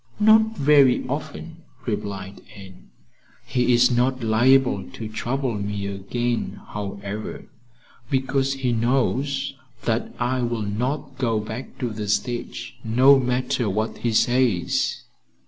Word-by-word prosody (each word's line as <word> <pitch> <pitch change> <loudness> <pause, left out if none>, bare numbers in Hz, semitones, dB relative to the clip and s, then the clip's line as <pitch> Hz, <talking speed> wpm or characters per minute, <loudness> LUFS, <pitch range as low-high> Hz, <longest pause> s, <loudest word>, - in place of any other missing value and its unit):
"Not 220 +1 +5
very 140 -3 +4
often," 155 +4 -5 0.3
replied 100 -3 -4
Anne. 95 -2 -13 0.6
"He 125 0 +1
is 120 +1 +5
not 125 +1 +1
liable 115 -3 +3
to 110 - -6
trouble 125 +4 -2
me 100 -1 -3
again, 115 +5 -2
however, 100 +1 -6 0.6
because 135 0 +1
he 135 -2 -1
knows 130 +4 0 0.3
that 115 0 -1
I 125 +1 0
will 120 -2 -1
not 130 +6 -3
go 115 -4 +1
back 110 +4 -7
to 125 -3 -2
the 105 -1 -5
stage, 120 +3 -2
no 130 +5 +6
matter 125 -1 0
what 110 +3 -2
he 120 - 0
says. 120 -5 +1
120 Hz, 120 wpm, -23 LUFS, 105-130 Hz, 0.6 s, no